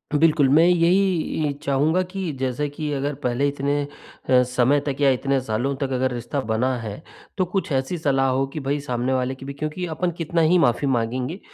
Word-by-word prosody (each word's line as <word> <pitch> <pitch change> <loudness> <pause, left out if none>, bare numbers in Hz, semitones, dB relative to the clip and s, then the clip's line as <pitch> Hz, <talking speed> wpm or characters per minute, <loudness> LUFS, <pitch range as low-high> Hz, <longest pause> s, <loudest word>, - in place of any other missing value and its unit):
बिल्कुल 150 -2 +4
मैं 155 +4 +6
यही 175 -2 +2
म - - 0
चाहूँगा 150 +6 +2
कि 190 -4 -3
जैसे 130 +2 -1
कि 150 +1 -4
अगर 140 +1 -1
पहले 125 +3 +1
इतने 140 -2 -1
समय 125 +3 +2
तक 140 -2 -2
या 140 - +5
इतने 135 +1 0
सालों 125 +3 -1
तक 135 -1 -3
अगर 130 0 0
रिश्ता 125 +3 -3
बना 125 +4 +1
है 110 +3 -6 0.4
तो 185 - +2
कुछ 180 -2 -3
ऐसी 135 +5 -1
सलाह 135 -4 +1
हो 130 +1 +1
कि 155 - -3
भाई 145 +1 0
सामने 125 -1 -1
वाले 130 0 -1
की 135 - -11
भी 140 - -6
क्योंकि 155 +5 -4
अपन 175 +2 -2
कितना 165 0 0
ही 165 +3 +4
माफ़ी 140 -3 +2
माँगेंगे? 125 - -1
140 Hz, 200 wpm, -23 LUFS, 130-155 Hz, 0.4 s, मैं